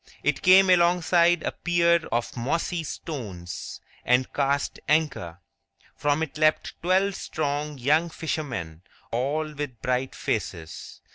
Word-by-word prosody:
It 145 -1 +1
came 185 +1 +7
alongside 175 -1 +4
a - - -1
pier 170 -1 +2
of 120 0 -1
mossy 165 +7 -1
stones, 105 - -7 0.2
and 125 +1 +2
cast 140 0 0
anchor. 145 - 0 0.6
From 145 +2 +1
it 150 -1 -6
leapt 155 0 +2
twelve 190 +3 +2
strong 150 -4 -3
young 155 +7 +2
fishermen, 130 - -4 0.3
all 150 +6 -1
with 145 -5 -6
bright 125 +1 -1
faces. 80 -1 -4
150 Hz, 120 wpm, -25 LUFS, 125-170 Hz, 0.6 s, came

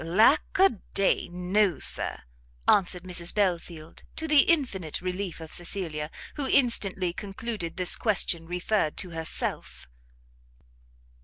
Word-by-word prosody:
"Lack 220 - +2
a 380 - +3 0.2
day, 195 -2 +2
no, 180 +1 0
Sir!" - - +1 0.5
answered 180 -3 +2
Mrs 175 -2 -2
Belfield, 170 -5 -3
to 320 - -4
the 300 -2 +5
infinite 225 - 0
relief 185 -1 -5
of 160 -1 -8
Cecilia, 170 -4 -1 0.3
who 280 -2 -2
instantly 195 -9 +2
concluded 200 -3 -6
this 180 -1 +3
question 175 -6 +2
referred 180 -1 -1
to 180 - -1
herself. 160 - -3
185 Hz, 120 wpm, -26 LUFS, 170-215 Hz, 0.5 s, the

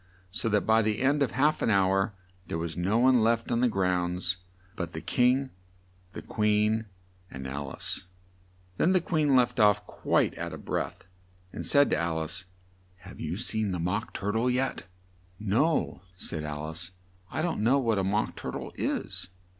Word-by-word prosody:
so 115 +3 -1
that 105 -1 +3
by 110 +1 +4
the 110 -1 0
end 140 +2 +2
of 135 - +1
half 150 +4 +2
an - - +2
hour 95 0 +2 0.3
there - - -2
was 80 0 -3
no 95 +6 +1
one 125 0 +5
left 115 +1 +1
on 115 - +2
the 125 - +5
grounds 90 -2 0 0.4
but 85 -4 -4
the 80 - -4
King, 130 +7 +2 0.6
the - - -7
Queen, 105 +1 +1 0.4
and 65 0 -7
Al 70 +1 -4
ice. - - -3 0.7
Then 185 - +3
the 185 - +5
Queen 155 -5 +2
left 125 -1 +3
off, 105 -1 +4
quite - - +1
out - - -4
of - - -9
breath, - - -3 0.5
and - - -4
said 145 -1 +5
to - - +3
Al 85 -1 0
ice, 80 +4 -4 0.6
"Have 95 +2 -12
you 80 +3 -3
seen 110 -3 -1
the 90 - -2
Mock 90 +4 -1
Tur 100 +1 -2
tle 115 +4 +1
yet?" 130 +2 -1 0.5
"No," 110 - +1 0.2
said 80 -4 -4
Al 75 0 -4
ice, 85 +2 -7 0.4
"I 155 - -2
don't 170 -9 -1
know 120 +6 +4
what 115 -6 +1
a - - +1
Mock 105 +3 0
tur - - -5
tle - - -5
is." 90 - -2
105 Hz, 185 wpm, -28 LUFS, 90-125 Hz, 0.7 s, one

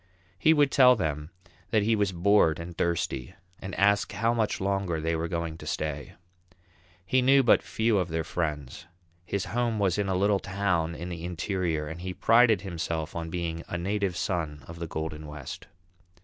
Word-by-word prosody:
He 160 - +5
would 145 -3 +4
tell 125 -2 +7
them 75 -6 -3 0.4
that 110 -3 +2
he 110 +2 +3
was 100 -2 +1
bored 90 -3 +3
and 85 +1 -7
thirsty 85 -4 -2 0.2
and 95 - -6
ask 100 +1 +2
how 115 +4 +1
much 110 -3 0
longer 95 -4 -1
they 80 +1 -1
were 80 +1 -2
going 85 -1 -3
to - - -9
stay. 75 -2 -3 0.9
He 130 +6 +2
knew 135 +2 +5
but 120 - +5
few 110 -2 +1
of 90 - 0
their 80 0 -1
friends; 75 -6 -4 0.4
his 100 0 -2
home 120 -2 0
was 100 -2 +1
in 100 -1 0
a 95 - +1
little 100 +1 +2
town 90 -4 -1
in 85 +2 -6
the 85 -2 -6
interior 85 -2 -2
and 80 +3 -7
he 90 0 -5
prided 115 -4 +4
himself 85 -4 -4
on 85 -1 -4
being 85 -1 -3
a 90 - -3
"Native 95 0 -1
Son 80 -7 -2
of 85 0 -9
the 85 - -4
Golden 80 -1 -5
West." 75 -3 -8
90 Hz, 185 wpm, -27 LUFS, 80-100 Hz, 0.9 s, tell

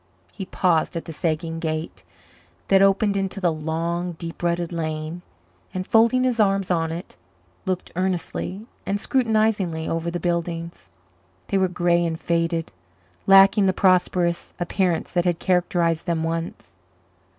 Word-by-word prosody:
He 190 - -7
paused 175 -2 +1
at 165 - -4
the 165 - -7
sagging 165 0 -2
gate 155 0 -4 0.7
that 195 0 +5
opened 200 +1 +3
into 195 0 -2
the 175 -4 +1
long, 165 +3 -2
deep 165 0 -8
rutted 170 0 -1
lane 155 +1 -4 0.5
and, 185 0 -2
folding 230 +4 +4
his 250 -2 0
arms 195 -2 +2
on 165 -2 +1
it, 170 +2 -7 0.5
looked 185 -1 -2
earnestly 185 +2 -2 0.2
and 200 +1 -1
scrutinizingly 215 - +1
over 165 +1 -2
the 175 +1 -3
buildings. 170 0 -3 0.6
They 195 - +2
were 190 - +3
grey 175 -1 +1
and 165 -1 -2
faded, 165 -1 -1 0.6
lacking 195 +1 +7
the 190 - +3
prosperous 180 -2 +2
appearance 175 -1 -1
that 175 0 +1
had 175 -2 +1
characterized 175 -2 +1
them 165 -2 0
once. 165 +1 -4
175 Hz, 140 wpm, -23 LUFS, 165-190 Hz, 0.7 s, lacking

